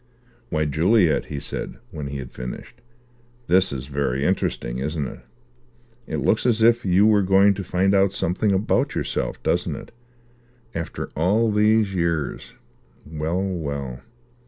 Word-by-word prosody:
"Why, 75 -5 0
Juliet," 85 +4 +3
he 75 - -5
said, - - -5
when 75 -5 -5
he 70 0 -5
had 65 -2 -7
finished, 60 - -8 0.6
"this 95 -1 +3
is 65 -1 -5
very 70 -1 -1
interesting, 65 -9 -1
isn't 75 +2 -2
it? - - -9 0.9
It - - -3
looks 110 - +2
as 115 -2 +2
if 120 +1 +5
you 95 +2 +4
were 105 -2 +5
going 95 +1 +5
to 100 0 -5
find 95 +2 +1
out 100 -1 +4
something 95 +3 0
about 95 +2 +1
yourself, - - -3
doesn't - - 0
it? - - -10 0.8
After 85 -1 -5
all 105 +8 +2
these 105 -1 +3
years! 85 -4 -2 0.5
Well, 80 +4 -2
well." 70 -9 -4
90 Hz, 145 wpm, -23 LUFS, 75-100 Hz, 0.9 s, if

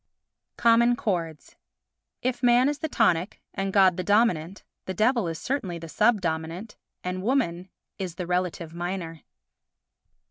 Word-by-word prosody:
Common 235 +1 +4
Chords 170 -9 -3 0.7
If 245 -1 -1
Man 245 +1 +5
is 290 0 -1
the 315 - -3
tonic 185 - +1
and 195 0 -2
God 190 -2 +5
the 185 - -2
dominant, 195 -3 +1 0.2
the 190 - -4
Devil 225 0 +2
is 165 -1 -3
certainly 195 - -3
the 165 0 -8
sub 215 +5 +2
dominant 165 +5 -4 0.3
and 180 0 -3
Woman 190 -7 0 0.3
is 185 -3 -4
the 180 - -4
relative 180 -2 -2
minor. 175 -2 -5
185 Hz, 140 wpm, -26 LUFS, 170-230 Hz, 0.7 s, Man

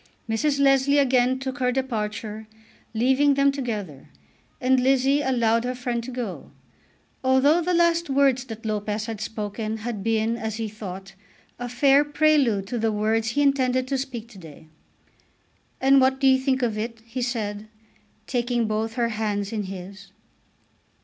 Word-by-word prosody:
Mrs. 280 +6 0
Leslie 275 0 +4
again 255 -2 +3
took 265 +1 -5
her 250 -1 +2
departure, 220 -4 -3 0.4
leaving 265 +5 +3
them 280 0 +4
together, 215 - -5 0.5
and 255 +1 +3
Lizzie 270 +2 +3
allowed 235 -4 +1
her 250 +1 -3
friend 245 -2 -3
to 245 - -7
go, 245 -6 -6 0.7
although 265 +6 +4
the 355 +1 0
last 340 -1 +2
words 270 -2 +2
that 225 -2 -9
Lopez 210 0 -2
had 220 -2 -6
spoken 215 +1 -4
had 220 -2 -5
been, 225 +1 0
as 220 -2 -4
he 225 0 -3
thought, 195 -2 -8 0.5
a 245 0 -4
fair 275 +3 +4
prelude 290 -9 +2
to 235 +4 -4
the 220 0 +1
words 220 +1 0
he 285 +6 +1
intended 255 -2 +1
to 275 - 0
speak 245 -4 -5
to 205 -5 -13
day. 160 -3 -13 1.1
"And 270 0 +5
what 265 0 +2
do 270 - 0
you 265 0 +5
think 260 -1 0
of 220 -3 -1
it?" 230 +1 -5
he 235 +2 -5
said, 215 -4 -3 0.6
taking 240 -1 0
both 220 +1 -2
her 235 -2 +1
hands 210 -2 -2
in 210 -2 -2
his. 190 +1 -9
240 Hz, 160 wpm, -24 LUFS, 215-265 Hz, 1.1 s, And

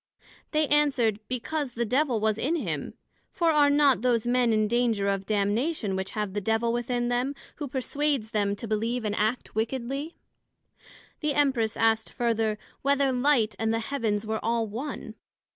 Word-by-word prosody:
They 305 0 +2
answered, 270 -8 +3
because 255 +2 -3
the 235 0 -1
Devil 255 0 +1
was 215 0 +1
in 310 +6 0
him; 335 - -3 0.4
for 335 -3 +2
are 295 -2 +5
not 285 -4 +4
those 240 -2 +2
men 245 -1 +2
in 215 -1 +2
danger 230 -3 +1
of 195 -1 -1
damnation 215 - 0
which 190 0 -3
have 210 -3 -2
the 205 - -2
Devil 225 +3 +1
within 240 0 -1
them, 250 +3 0 0.2
who 295 - -4
perswades 270 -2 -1
them 205 -2 +1
to 230 - -6
believe 225 +3 -1
and 210 - 0
act 220 +4 -1
wickedly? 265 +7 -3 1.0
The 300 -2 -1
Empress 260 -7 +1
asked 225 0 +2
further, 225 -3 0 0.2
Whether 280 0 +2
Light 250 -3 +2
and 225 0 +1
the 225 - +1
Heavens 225 -4 -1
were 220 0 -3
all 230 0 +1
one? 240 +8 -6
235 Hz, 165 wpm, -27 LUFS, 220-275 Hz, 1.0 s, are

